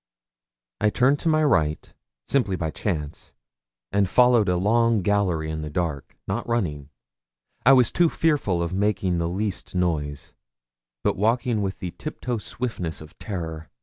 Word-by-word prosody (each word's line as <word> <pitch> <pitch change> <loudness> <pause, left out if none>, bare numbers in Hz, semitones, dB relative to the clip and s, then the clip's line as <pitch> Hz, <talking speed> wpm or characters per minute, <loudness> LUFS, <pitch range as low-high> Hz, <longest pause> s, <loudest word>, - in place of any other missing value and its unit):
I 105 - +3
turned 130 +6 +3
to 165 - 0
my 155 0 +3
right, 80 - +1 0.3
simply 125 -9 +1
by 80 -3 -2
chance, 75 -7 -4 0.6
and 100 -1 +2
followed 120 -3 +5
a 90 - +2
long 115 +2 +2
gallery 90 -6 +1
in 80 0 -4
the 75 - -5
dark, 75 -4 -3
not 105 +6 -2
running 80 -12 -2 0.8
I 135 - +9
was 125 -3 +5
too 175 -1 +3
fearful 140 - +1
of 85 +1 -3
making 95 -3 +1
the 85 0 -1
least 100 +1 -3
noise 75 -5 -2 0.7
but - - +1
walking 115 +2 +1
with 95 -1 -2
the 90 -3 -5
tiptoe 120 - -4
swiftness 105 -7 -4
of 75 -1 -13
terror. 80 -5 -5
95 Hz, 150 wpm, -24 LUFS, 85-115 Hz, 0.8 s, I